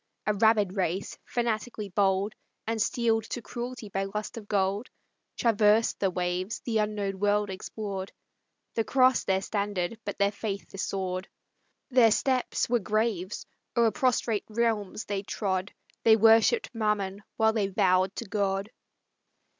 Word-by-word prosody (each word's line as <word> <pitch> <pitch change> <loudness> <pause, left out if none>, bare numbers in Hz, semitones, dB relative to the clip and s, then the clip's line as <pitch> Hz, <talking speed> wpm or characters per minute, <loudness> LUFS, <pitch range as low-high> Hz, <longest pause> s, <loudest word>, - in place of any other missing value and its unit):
A 210 - +2
rabid 210 -2 +3
race, 190 0 -1
fanatically 225 -3 -2
bold, 195 +2 +1 0.3
And 225 0 -1
steel'd 225 -1 +1
to 245 - -5
cruelty 240 -2 -6
by 195 0 -2
lust 210 +2 -5
of 220 -3 -8
gold, 200 +3 0 0.5
Traversed 220 -1 +3
the 195 - +2
waves, 180 +3 -2
the 225 -2 0
unknown 205 -2 -1
world 205 0 +2
explored, 195 0 -5 0.6
The 225 - +1
cross 255 +1 +4
their 190 0 +1
standard, 200 0 -2
but 200 - -5
their 200 0 +3
faith 205 -1 -4
the 195 - -8
sword; 185 -1 -2 0.6
Their 245 -3 +6
steps 255 +3 +1
were 240 0 +2
graves; 215 -2 -1 0.3
o'er 230 -1 +5
prostrate 235 -4 +1
realms 220 -2 -1
they 200 -1 -2
trod; 195 -2 -2 0.3
They 225 -1 +6
worshipp'd 225 - +5
Mammon 210 -3 -1 0.2
while 220 0 +4
they 210 -3 +1
vow'd 185 -1 +2
to 235 - -5
God. 200 0 -1
210 Hz, 140 wpm, -28 LUFS, 195-225 Hz, 0.6 s, Their